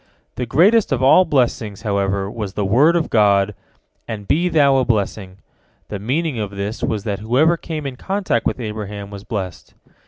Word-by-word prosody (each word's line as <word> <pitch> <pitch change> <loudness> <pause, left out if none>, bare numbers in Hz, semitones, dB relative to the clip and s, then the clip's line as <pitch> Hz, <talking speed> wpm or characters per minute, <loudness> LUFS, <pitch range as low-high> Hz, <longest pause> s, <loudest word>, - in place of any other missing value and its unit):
The 125 0 -4
greatest 190 - +4
of 130 -1 0
all 180 +8 +6
blessings, 115 - -1
however, 100 -2 -1
was 105 -2 -5
the 100 0 -2
word 140 - +4
of 165 -2 -1
God, 100 -1 +3 0.5
"And 105 -3 -6
be 175 +4 +2
thou 140 -5 +4
a 130 - +2
blessing." 100 -4 -2 0.5
The 100 - -5
meaning 135 - -1
of 105 -2 -3
this 100 +2 -5
was 105 -3 -2
that 100 -3 -3
whoever 130 +10 +2
came 155 -3 -6
in 130 -2 -5
contact 190 - -1
with - - -3
Abraham 105 -3 -6
was 100 -1 -9
blessed. 95 -7 -6
110 Hz, 180 wpm, -19 LUFS, 100-140 Hz, 0.5 s, all